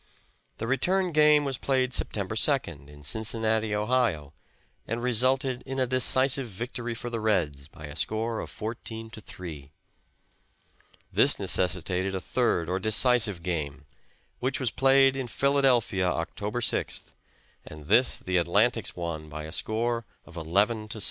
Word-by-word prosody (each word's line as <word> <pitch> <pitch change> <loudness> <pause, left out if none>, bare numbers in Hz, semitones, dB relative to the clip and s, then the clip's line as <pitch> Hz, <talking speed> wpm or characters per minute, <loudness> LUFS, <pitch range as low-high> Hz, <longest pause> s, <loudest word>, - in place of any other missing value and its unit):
The 115 - -5
return 180 +9 0
game 150 -1 +4
was 135 -2 -3
played 130 -2 0
September 100 -4 -1
2d, 105 - 0
in 75 0 -15
Cincinnati, 110 +4 +1
Ohio, 105 - -1 0.5
and 115 +2 -4
resulted 130 +1 +1
in 135 0 -6
a 130 - +2
decisive 130 +1 +4
victory 120 +3 -6
for 120 +1 -7
the 115 - -3
Reds, 85 -11 -1
by 75 0 -12
a 75 0 -9
score 110 +7 -2
of - - -6
14 115 0 -7
to 110 - -10
3. 80 -8 -9 1.4
This - - +4
necessitated 95 +1 0
a - - -2
third 115 -7 -1
or 90 +2 -2
decisive 110 -3 +4
game, 75 -5 -4 0.5
which 130 +2 -2
was 130 -4 0
played 135 0 +3
in 135 -2 -4
Philadelphia 125 -8 +1
October 105 +7 -4
6th, - - -1 0.5
and 75 -1 -12
this 125 - +3
the 90 -1 -1
Atlantics 105 +5 +1
won 85 -3 -6
by 75 0 -7
a 80 - -8
score 115 +5 -2 0.2
of 85 - -15
11 100 +7 0
to 110 - -6
7. - - -7
110 Hz, 150 wpm, -26 LUFS, 90-125 Hz, 1.4 s, game